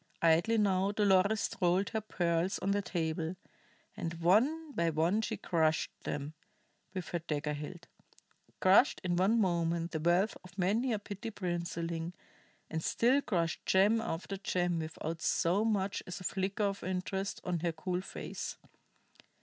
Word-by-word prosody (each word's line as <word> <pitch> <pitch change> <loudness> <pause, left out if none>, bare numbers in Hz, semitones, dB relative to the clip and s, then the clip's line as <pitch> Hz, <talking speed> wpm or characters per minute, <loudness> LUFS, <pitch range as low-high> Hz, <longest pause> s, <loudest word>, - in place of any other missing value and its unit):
Idly 170 +8 +4
now 195 -2 +2
Dolores 205 0 +3
rolled 180 +3 +3
her 220 -1 -2
pearls 175 -3 0
on 195 - -1
the 205 0 +2
table, 165 -2 -2 0.6
and 165 0 -4
one 250 - +2
by 170 -10 +1
one 165 +7 +2
she 220 -1 -2
crushed 160 -4 +1
them 145 +1 -3 0.6
with 180 -4 -4
her 175 - -1
dagger 150 -2 -2
hilt 160 +4 -7 0.7
crushed 195 +8 +5
in 175 -1 0
one 195 +6 +3
moment 170 -3 +1
the 160 - -2
wealth 175 +6 +2
of 185 +1 -15
many 215 +8 +1
a 220 - +1
petty 205 +2 -6
princeling, 170 -3 -3 0.5
and 160 0 -3
still 255 +5 +3
crushed 170 - -1
gem 205 +4 +4
after 195 -2 -4
gem 175 -3 0
without 160 +1 -5
so 180 +5 +2
much 200 -3 0
as 180 -1 -5
a - - -9
flicker 195 +3 -1
of 200 -1 -1
interest 190 +2 -2
on 180 -2 -1
her 170 +1 0
cool 180 +3 -3
face. - - -6
180 Hz, 150 wpm, -32 LUFS, 170-200 Hz, 0.7 s, crushed